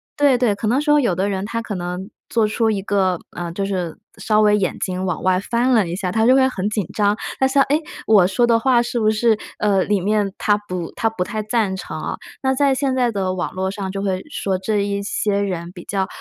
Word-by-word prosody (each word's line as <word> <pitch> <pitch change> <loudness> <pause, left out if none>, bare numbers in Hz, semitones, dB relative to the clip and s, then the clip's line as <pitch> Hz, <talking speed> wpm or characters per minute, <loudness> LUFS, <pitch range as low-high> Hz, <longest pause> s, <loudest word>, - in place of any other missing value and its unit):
对 285 -3 +4
对， 240 -5 +2
可 200 - -5
能 245 +6 +2
说 295 -1 +4
有 235 -8 +1
的 190 +3 0
人 195 -1 -2
他 230 +2 -3
可 215 -3 -5
能 180 +2 -5 0.2
做 225 -2 +2
出 220 +1 +1
一 200 -2 -1
个， 190 -3 +1 0.2
呃， 175 -1 -4
就 195 +3 -2
是 180 -4 -3 0.2
稍 215 -1 +2
微 210 -1 +4
眼 190 -3 -1
睛 185 0 -2
往 185 -3 -2
外 185 0 +2
翻 235 +5 0
了 215 -6 +3
一 170 - -3
下， 185 -1 -2
他 220 +3 +2
就 250 - +6
会 265 0 +5
很 195 -6 -3
紧 210 -5 -1
张。 205 -1 +2 0.2
他 265 - +4
想 275 +1 +3
哎， 295 +2 +3 0.3
我 205 -5 +6
说 195 +6 +2
的 230 -1 +4
话 245 0 +3
是 240 0 -2
不 215 -1 +3
是， 220 0 +2 0.2
呃， 200 -3 +2
里 205 -2 0
面 205 0 0
他 205 -1 +3
不 180 -2 -4
他 225 - 0
不 225 -5 -1
太 215 +3 -4
赞 215 -3 0
成 190 - -6
啊。 - - -4 0.2
那 265 0 +2
在 275 0 +3
现 265 0 0
在 245 -2 +2
的 190 -3 -1
网 180 - -3
络 190 0 -2
上 195 -1 -4
就 195 0 -4
会 190 -2 -1
说 195 -7 -1
这 210 +3 -1
一 200 0 -2
些 200 0 0
人 180 -4 -3
比 180 -2 -11
较， 195 -2 -1
205 Hz, 265 characters per minute, -20 LUFS, 190-230 Hz, 0.3 s, 就